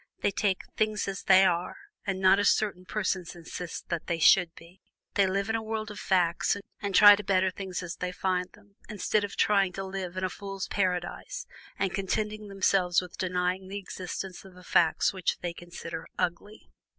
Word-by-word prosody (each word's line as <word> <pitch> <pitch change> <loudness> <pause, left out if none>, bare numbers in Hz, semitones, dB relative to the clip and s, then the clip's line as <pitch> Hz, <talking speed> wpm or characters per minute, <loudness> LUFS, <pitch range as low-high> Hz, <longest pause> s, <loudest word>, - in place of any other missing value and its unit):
They - - +2
take 195 -1 0
"things 215 -1 0
as 195 -1 -4
they 190 0 +6
are," 180 - 0 0.3
and 190 -1 -1
not 190 +1 +5
as 205 - +4
certain 195 -4 0
persons 185 -4 -2
insist 170 0 -7
that 170 -2 -3
"they 170 - 0
should 170 +1 +5
be" 175 +3 -16 0.3
they 200 -1 +3
live 195 +2 -1
in 220 - 0
a 225 - -1
world 220 0 -4
of 210 - -8
facts 180 -2 +2 0.2
and 200 -2 -2
try 205 0 +10
to 210 - -6
better 190 -1 +2
things 185 -1 -5
as 170 -1 -6
they 180 0 -3
find 180 0 -1
them, 205 -1 -22
instead 210 0 0
of 205 - -5
trying 195 -3 +3
to 195 - -4
live 190 -1 -5
in 185 - -2
a 185 - +1
fool's 195 -2 -6
paradise 190 - -2 0.3
and 195 -2 -1
contenting 210 +2 -2
themselves 190 -2 +2
with 180 -1 -8
denying 180 +1 -1
the 195 +2 -5
existence 185 -1 -6
of 190 -2 -15
the 180 - -14
facts 165 0 +3
which 185 -3 -1
they 175 -1 -3
consider 170 -1 -8
"ugly." 205 +5 -4
190 Hz, 195 wpm, -28 LUFS, 180-200 Hz, 0.3 s, try